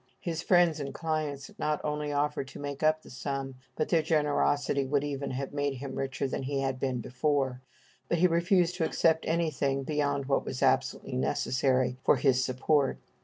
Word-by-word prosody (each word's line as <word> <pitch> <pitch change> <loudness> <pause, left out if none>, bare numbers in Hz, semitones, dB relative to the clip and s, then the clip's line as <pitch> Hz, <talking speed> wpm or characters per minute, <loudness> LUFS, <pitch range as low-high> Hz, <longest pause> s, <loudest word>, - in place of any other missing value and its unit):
His 165 -2 -3
friends 175 -3 +4
and 140 -1 -5
clients 155 -4 -3
not 150 -1 0
only 150 0 -2
offered 145 -1 -1
to - - -10
make 145 -1 -5
up 155 0 +2
the - - -13
sum, 135 +1 -4 0.2
but 155 - -1
their 165 - +4
generosity 145 -2 +1
would 140 +1 0
even 140 -1 -3
have 135 +2 -4
made 145 -1 -1
him 135 +1 -6
richer 135 0 -2
than 130 - -3
he 135 +1 -2
had 135 -1 -1
been 130 -2 -1
before; 130 0 -1 0.5
but 170 - +2
he 175 - +4
refused 175 +1 +3
to 170 - 0
accept 160 0 +2
anything 145 -5 0
beyond 145 -1 0
what 135 0 +1
was - - -4
absolutely - - +1
necessary 125 - +1
for - - +5
his 130 -2 +2
support. 135 +2 +1
145 Hz, 180 wpm, -29 LUFS, 135-155 Hz, 0.5 s, for